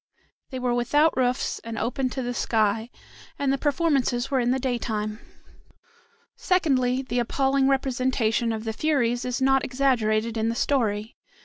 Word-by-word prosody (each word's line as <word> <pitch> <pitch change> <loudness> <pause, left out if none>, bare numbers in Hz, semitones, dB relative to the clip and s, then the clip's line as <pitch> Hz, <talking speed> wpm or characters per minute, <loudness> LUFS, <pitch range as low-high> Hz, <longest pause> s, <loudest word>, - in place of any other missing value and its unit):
They 260 - -5
were 250 -1 0
without 290 +7 +2
roofs 250 -1 0
and 230 -1 -7
open 255 +4 -1
to 260 +1 -4
the 245 0 -3
sky, 220 -1 0 0.5
and 275 -1 +1
the - - 0
performances 275 -5 0
were 270 - +2
in 240 -1 +1
the 255 - +2
daytime. 220 -4 -2 1.2
Secondly, 265 -8 +1
the 250 -2 -2
appalling 270 +3 +1
representation 255 -4 +1
of 220 -1 -4
the 220 -1 -3
Furies 245 -4 0
is 250 +1 -2
not 270 0 +3
exaggerated 230 -4 0
in 220 +1 0
the 230 - -2
story. 225 -5 -1
250 Hz, 150 wpm, -25 LUFS, 230-270 Hz, 1.2 s, not